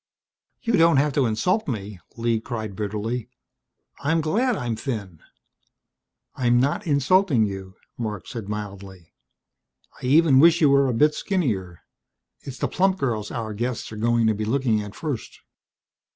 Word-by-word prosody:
"You 230 - 0
don't 165 -3 +5
have 145 +1 +2
to 135 -3 +2
insult 180 - 0
me!" 105 -6 -5 0.2
Lee 115 -1 +1
cried 110 -3 -5
bitterly. 110 +4 -3 0.7
"I'm 160 +4 +1
glad 220 - +1
I'm 120 - -2
thin!" 105 - -5 1.2
"I'm 120 -2 +2
not 145 +9 0
insulting 145 - +3
you," 95 -2 -6 0.2
Marc 105 -4 -4
said 110 -4 -7
mildly. 100 -4 -7 0.9
"I - - -3
even 145 -1 +5
wish 170 +3 +6
you 150 -4 +5
were 140 0 +4
a - - +1
bit 150 +6 +4
skinnier. 105 - -2 0.6
It's 135 -2 -9
the - - -1
plump 190 0 +1
girls 110 - -2
our 110 -2 -4
guests 120 +2 -3
are - - -7
going 115 +1 +1
to 110 - +3
be 110 +1 -3
looking 115 -1 +1
at 105 -1 -8
first. 145 -8 -5
120 Hz, 150 wpm, -24 LUFS, 105-145 Hz, 1.2 s, wish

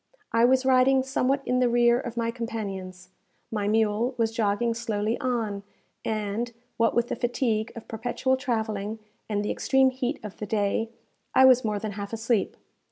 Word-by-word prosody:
I 230 +1 +4
was 260 +1 +3
riding 260 0 +4
somewhat 265 +1 0
in 250 - +1
the 250 -1 +3
rear 240 0 +4
of 240 -3 -6
my 230 0 0
companions. 195 -6 -6 0.4
My 210 -2 -1
mule 220 +3 +1
was 225 -1 +1
jogging 225 +1 +1
slowly 225 -1 -1
on, 225 -6 -1 0.4
and, 215 +2 -2 0.3
what 230 0 +2
with 240 0 +1
the - - -1
fatigue 235 -3 -1
of 230 - -9
perpetual 245 +3 -1
travelling, 220 -5 -2 0.3
and 205 -1 -1
the - - -1
extreme 265 -1 +3
heat 255 +2 -3
of 210 -2 -8
the 210 - -5
day, 210 +1 0 0.5
I 260 - +8
was 255 -1 +6
more 215 -2 -1
than 215 +1 -4
half 200 +1 -6
asleep. 225 -1 0
230 Hz, 170 wpm, -26 LUFS, 210-250 Hz, 0.5 s, I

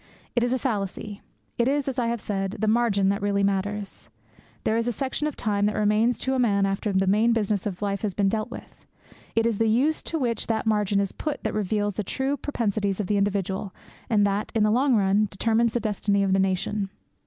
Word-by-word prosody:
It 240 - +3
is 245 - +1
a 260 - +2
fallacy. 205 -4 -3 0.4
It 235 - +3
is, 280 0 +1
as 265 -1 -1
I 235 - +1
have 235 0 -1
said, 195 -2 -2
the 220 - -1
margin 215 -4 +3
that 200 0 0
really 200 0 +1
matters. 200 +1 -2 0.5
There 220 - +1
is 230 +1 0
a - - +2
section 270 +4 -2
of 300 - -4
time 205 -2 0
that 210 - -1
remains 215 +3 +2
to 265 - 0
a 260 - 0
man 200 -5 +3
after 195 +2 -1
the 190 0 +2
main 215 +5 +3
business 210 -3 0
of 195 0 -5
life 200 -1 -1
has 205 -4 -2
been 200 -2 +2
dealt 215 +3 -1
with. - - -11 0.5
It 225 0 +3
is 230 -3 0
the 225 -1 +3
use 275 +8 +2
to 330 - -2
which 235 -6 -1
that 220 -1 -1
margin 210 -2 +2
is 200 -1 0
put 300 -2 -4
that 220 - -1
reveals 205 0 0
the 210 - -3
true 265 +8 -1
propensities 215 -8 -1
of 210 - 0
the 205 +2 +1
individual 195 -1 -1 0.3
and 210 -2 +4
that, 200 +1 -1
in 220 - +3
the 210 - +3
long 255 +2 +3
run, 205 +1 +3
determines 225 +4 +1
the 240 - +1
destiny 205 -2 0
of 195 -1 +1
the 195 - +3
nation. 195 +1 0
210 Hz, 230 wpm, -25 LUFS, 200-235 Hz, 0.5 s, and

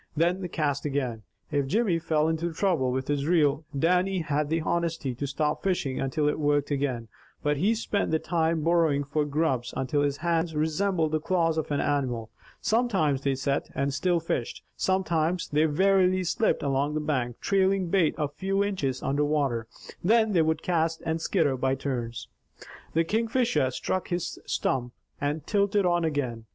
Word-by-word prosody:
Then 175 +4 +2
they 180 - -3
cast 145 -4 -1
again. 130 -6 -2 0.3
If 140 -2 0
Jimmy 200 - +1
fell 155 -1 +1
into 165 +1 -1
trouble 160 -8 +1
with 130 +1 -2
his 145 0 -1
reel, 155 -3 +2
Dannie 180 +4 +2
had 150 -1 -1
the 165 +1 +1
honesty 165 -5 -1
to 140 +4 -4
stop 150 +2 -1
fishing 175 -9 -1
until 140 +3 0
it 150 - 0
worked 145 -1 +1
again, 135 -5 -1 0.4
but 150 0 +1
he 205 +10 +2
spent 210 -2 -1
the 160 - +2
time 165 -1 0
burrowing 165 -4 +3
for 150 +2 -1
grubs 140 -5 -1
until 135 +2 0
his 145 -1 0
hands 165 0 0
resembled 160 +1 +1
the 155 - +1
claws 165 0 +1
of 155 - -4
an 145 -1 0
animal. 125 -6 -1 0.3
Sometimes 195 - +1
they 140 -1 0
sat, 140 +1 -1
and 140 0 0
still 175 +5 +1
fished. 145 -7 -3
Sometimes, 175 -2 0
they 150 +2 +3
warily 185 +3 +3
slipped 180 +2 +1
along 140 +2 0
the - - +1
bank, 130 -6 -2
trailing 195 -2 +1
bait 175 -4 +2
a 150 -2 0
few 195 +7 -1
inches 145 -11 -2
under 145 +2 +1
water. 140 -7 0 0.4
Then 220 +3 +4
they 175 -4 +4
would 160 0 0
cast 165 -2 0
and 160 0 -1
skitter 160 -7 +1
by 130 +1 0
turns. 120 -5 -4 0.7
The 165 - +4
Kingfisher 230 - +1
struck 185 +8 -2
his 175 -2 -3
stump, 125 -2 -1 0.3
and 145 +1 -2
tilted 200 -1 +2
on 175 -1 +2
again. 130 -8 -2
155 Hz, 175 wpm, -27 LUFS, 140-175 Hz, 0.7 s, Then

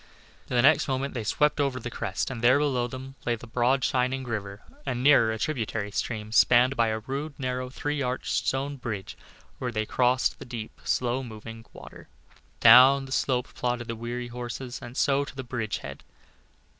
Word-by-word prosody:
The 125 - 0
next 140 - +5
moment 135 +1 -2
they 120 - -3
swept 150 +8 +1
over 135 -2 0
the 120 0 -6
crest, 105 +1 -3
and 120 -3 -6
there, 125 +3 +6
below 135 -5 +1
them, 130 +2 -8
lay 120 - 0
the 115 - -11
broad 125 +3 +1
shining 130 +1 0
river, 105 -4 -5 0.2
and 125 - -3
nearer 135 -6 +6
a 110 - -3
tributary 110 -5 -2
stream 110 0 -3
spanned 125 +3 +5
by 115 -2 +2
a 110 0 -1
rude, 140 +6 -5
narrow, 130 -1 -3
three 145 +2 -3
arched, 125 0 -2
stone 140 +2 -1
bridge 110 -7 -5 0.4
where 125 -1 -2
the 110 -2 -1
road 110 - -6
crossed 125 0 +2
the - - -7
deep, 120 -3 -8
slow 125 +1 0
moving 115 -1 -9
water. - - -12 0.5
Down 130 +4 +8
the 130 - -11
slope 125 -2 0
plodded 120 -1 -2
the 115 - -4
weary 120 +2 -5
horses, 125 +1 -6
and 120 +2 -9
so 140 0 +2
to 140 - -10
the 135 - -5
bridge 115 -4 -3
head. - - -8
125 Hz, 190 wpm, -27 LUFS, 115-135 Hz, 0.5 s, Down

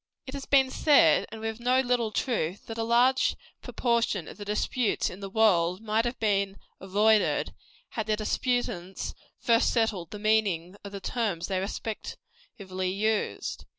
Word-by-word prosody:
It 260 - -8
has 275 -1 -6
been 265 -2 +4
said, 285 - +4
and 220 0 -8
with 220 0 -4
no 250 +2 +2
little 245 -3 +1
truth, 205 - -2
that 225 0 -7
a - - 0
large 245 +3 +3 0.3
proportion 235 -7 0
of - - -10
the 205 - -7
disputes 210 +3 0
in 180 - -10
the 195 -1 -6
world 185 -5 +3
might 220 +1 0
have 240 +1 -3
been 200 -2 0 0.2
avoided, 210 +3 +2 0.4
had 220 -2 -4
the 215 - +2
disputants 215 -4 -2 0.2
first 230 +1 +3
settled 220 -8 0
the 210 - -7
meaning 205 -5 +1
of 200 - -8
the 200 -1 -7
terms 200 -7 -2
they 190 -1 0
respectively 195 - -6
used. 210 +3 -2
215 Hz, 155 wpm, -28 LUFS, 195-235 Hz, 0.4 s, been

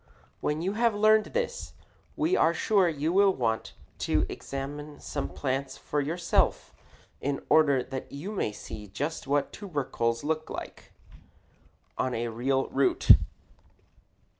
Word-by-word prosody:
When 150 +2 -1
you 190 +2 0
have 230 0 +2
learned 215 +1 +5
this, 485 +1 -3 0.4
we 325 +4 +2
are 165 +1 +3
sure 195 0 +3
you 155 +1 -1
will 195 0 +5
want 115 -3 -1 0.3
to - - +1
examine 145 +2 -6
some 145 - -4
plants 135 -1 -3
for 145 - -2
yourself 165 +4 0 0.5
in 140 0 -2
order 140 -5 +5
that 130 0 -7
you 155 +9 -6
may 195 - -1
see 105 0 -9
just 145 +10 -4
what 140 0 +1
tubercles 130 - -2
look 155 +1 -2
like - - -8 1.1
on 130 -1 0
a 115 +1 -2
real 130 +4 0
root. 135 0 +4
145 Hz, 135 wpm, -28 LUFS, 135-185 Hz, 1.1 s, learned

